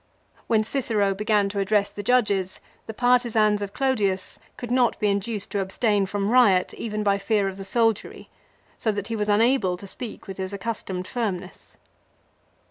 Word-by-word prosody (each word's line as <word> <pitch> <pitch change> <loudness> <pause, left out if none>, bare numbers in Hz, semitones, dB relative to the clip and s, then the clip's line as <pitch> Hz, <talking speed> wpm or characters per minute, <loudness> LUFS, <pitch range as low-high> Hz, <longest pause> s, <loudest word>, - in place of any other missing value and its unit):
When 220 -2 +3
Cicero 215 -5 0
began 210 0 +1
to 200 0 -3
address 200 0 +1
the 205 - -6
judges, 200 -5 +1 0.3
the 220 - -5
partisans 230 -4 +3
of 200 -1 -4
Clodius 205 -9 0 0.2
could 240 -1 -6
not 250 -2 +2
be 210 - +2
induced 200 +1 -3
to 200 - -1
abstain 200 +1 +1
from 200 +1 -1
riot 205 -8 +4
even 215 -2 -4
by 200 -1 +2
fear 205 -1 +1
of 190 0 -5
the 195 - -6
soldiery; 225 +1 0 0.5
so 220 - +1
that 205 +1 -4
he 230 - -2
was 210 -1 -1
unable 210 -3 +3
to 200 - -10
speak 220 +3 -7
with 195 -2 -8
his 190 +1 -4
accustomed 195 -3 -4
firmness. 195 -6 -5
210 Hz, 170 wpm, -24 LUFS, 195-230 Hz, 0.5 s, riot